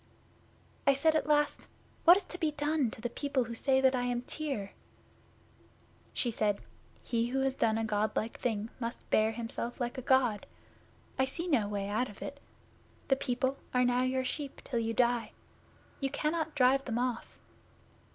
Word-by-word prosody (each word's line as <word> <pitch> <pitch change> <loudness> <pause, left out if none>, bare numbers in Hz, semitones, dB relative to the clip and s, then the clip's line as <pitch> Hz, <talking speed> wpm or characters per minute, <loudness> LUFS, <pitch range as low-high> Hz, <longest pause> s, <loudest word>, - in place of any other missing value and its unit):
'I 275 - +6
said 315 +3 +3
at 310 - +1
last, 295 -1 +2 0.4
"What 345 +2 +9
is 400 - -3
to 360 0 -9
be 320 -4 +2
done 295 -3 +1
to 220 - -10
the 240 - -2
people 280 -2 0
who 235 0 -6
say 265 +3 +2
that 265 0 +5
I 250 - +1
am 245 0 -1
Tyr?" 270 -10 -3 1.4
'She 240 - +1
said, 210 -2 +1 0.4
"He 235 -1 0
who 265 +2 0
has 270 0 +1
done 225 -4 +1
a 225 - 0
God 215 0 0
like 225 +2 -2
thing 220 -2 -2
must 235 -1 -5
bear 215 +1 +4
himself 235 +2 -4
like 245 +1 -2
a - - -5
God. 255 -5 +2 0.7
I 265 - +5
see 335 +7 -4
no 250 -11 +2
way 200 -1 -2
out 220 +4 0
of 205 - -9
it. 280 0 -7 0.7
The 270 - +5
people 260 0 -1 0.2
are 250 0 +4
now 245 0 +2
your 260 0 0
sheep 280 +1 -4
till 240 - -2
you 225 0 -1
die. 240 -1 +2 0.7
You 275 - 0
cannot 310 +2 -1
drive 270 +1 +4
them 230 -2 -2
off." 245 -1 -2
250 Hz, 180 wpm, -31 LUFS, 230-275 Hz, 1.4 s, What